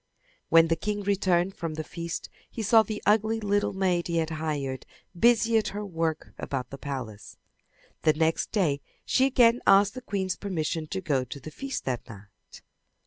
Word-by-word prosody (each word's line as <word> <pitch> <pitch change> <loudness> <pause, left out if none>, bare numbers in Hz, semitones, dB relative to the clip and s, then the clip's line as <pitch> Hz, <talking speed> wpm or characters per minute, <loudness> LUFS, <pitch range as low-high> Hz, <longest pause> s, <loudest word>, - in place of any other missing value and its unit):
When 165 0 +6
the 165 - +3
king 205 +5 -3
returned 190 -2 +1
from 165 -2 -4
the 155 - -3
feast 170 +2 -5 0.2
he 225 - -5
saw 220 +2 +6
the 215 -1 -5
ugly 220 +2 +3
little 205 -1 +1
maid 185 -3 0
he 170 -1 -1
had 165 0 0
hired 150 -4 -3 0.3
busy 230 +3 +4
at 215 - -3
her 205 +1 -4
work 165 -4 -3
about 130 -3 -4
the 135 - -8
palace. 125 -8 -6 0.6
The 155 - +4
next 160 +1 0
day 155 -9 +1 0.2
she 260 - +3
again 245 -2 +4
asked 200 +1 +6
the 255 - -7
queen's 190 -6 -2
permission 165 -5 -3
to 190 +4 -4
go 140 -8 0
to 135 +3 -8
the 155 - -9
feast 270 - -5
that 125 -2 -3
night. 105 -1 -14
175 Hz, 180 wpm, -27 LUFS, 155-205 Hz, 0.6 s, When